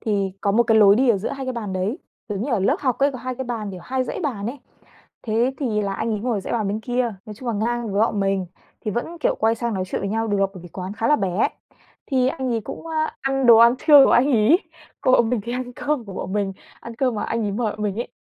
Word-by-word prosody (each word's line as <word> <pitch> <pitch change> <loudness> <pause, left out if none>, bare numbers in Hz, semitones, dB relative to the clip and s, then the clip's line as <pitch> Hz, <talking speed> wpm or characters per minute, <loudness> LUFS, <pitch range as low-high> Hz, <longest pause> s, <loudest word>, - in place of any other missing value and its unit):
thì 200 -3 -1
có 200 - +1
một 235 +3 +4
cái 225 -1 +3
lối 200 -1 +7
đi 260 0 +3
ở 220 - +5
giữa 195 - -3
hai 270 -1 -5
cái 255 - -2
bàn 215 -5 -5
đấy, 195 - -2 0.3
giống 205 0 -3
như 280 - -3
ở 225 - +2
lớp 195 - +2
học 255 -4 0
ấy 280 0 +3
có 255 - -6
2 255 +1 -4
cái 260 +1 -5
bàn 225 -4 -4
kiểu 185 -2 -8
2 260 0 -1
dãy 395 - -5
bàn 235 - -3
ấy. 265 +4 -5 0.6
Thế 235 +4 +1
thì 220 -7 0
là 195 -1 -2
anh 230 - -2
ấy 210 - -2
ngồi 240 -1 -1
ở - - -4
dãy - - -5
bàn 220 -4 0
bên 210 +2 -2
kia, 245 -1 -1
nói 215 - -8
chung 240 +3 -7
là 230 - 0
ngang 230 0 -1
với 200 - +1
bọn 215 -2 +1
mình, 195 -1 0 0.3
thì 215 - -3
vẫn, 280 - -4
kiểu, - - +2
quay 225 +1 +2
sang 235 -2 -3
nói 185 -1 -1
chuyện - - -3
với 195 0 -3
nhau 225 +1 -1
được 205 - +1 0.2
bởi 180 - -10
vì 175 - -10
quán 185 +3 -6
khá 225 +2 -1
là 295 - +5
bé. 190 +1 +1 0.6
Thì 260 -2 +2
anh 260 -2 -2
ấy 225 - 0
cũng, 270 - -8
ơ, 320 -1 -4 0.2
ăn 270 -1 0
đồ 235 -2 +9
ăn 235 +2 +7
trưa 290 -2 +8
của - - +3
anh 245 - +5
ấy, 240 +9 +5 0.4
còn 255 - +4
bọn 235 -2 +3
mình 245 - 0
thì 235 - -4
ăn 250 0 -4
cơm 280 0 -2
của 200 - -9
bọn 190 - -5
mình, 200 -2 -1 0.3
ăn 235 - -9
cơm 255 -1 +1
mà 210 - -2
anh 230 0 -2
ấy 205 - -1
mời 220 0 -1
bọn 215 - -7
mình 205 -2 -1
ấy. - - -4
230 Hz, 300 wpm, -22 LUFS, 205-255 Hz, 0.6 s, đồ